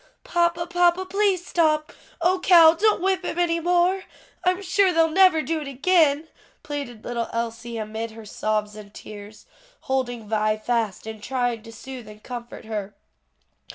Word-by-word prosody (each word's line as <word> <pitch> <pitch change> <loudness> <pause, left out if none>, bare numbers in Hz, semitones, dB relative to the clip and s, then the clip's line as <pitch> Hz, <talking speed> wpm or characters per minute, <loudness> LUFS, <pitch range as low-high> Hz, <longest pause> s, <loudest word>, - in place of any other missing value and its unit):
"Papa, 340 0 +1
papa, 355 +1 +2
please 385 -2 +1
stop. 310 -2 +1 0.3
O, 365 +2 +3
Cal, 335 -3 +7
don't 410 +2 +2
whip 380 -1 +1
him 350 - -4
any 340 -1 +1
more. 355 +3 +2 0.4
I'm 365 +2 +1
sure 380 +1 +3
they'll 325 -1 +3
never 365 -3 +5
do 320 -1 -2
it 290 - -6
again," 300 +2 +2 0.4
pleaded 280 -7 -6
little 235 -1 -3
Elsie 230 0 -4
amid 220 +1 -4
her 220 0 -12
sobs 210 0 -2
and 210 -1 -11
tears, 210 0 -11 0.4
holding 245 -4 -2
Vi 215 0 +1
fast 220 -3 -2
and 220 -1 -8
trying 245 -2 -1
to 225 +1 -12
soothe 250 0 -9
and 215 0 -13
comfort 240 -2 -8
her. 210 -2 -5
275 Hz, 155 wpm, -24 LUFS, 225-350 Hz, 0.4 s, Cal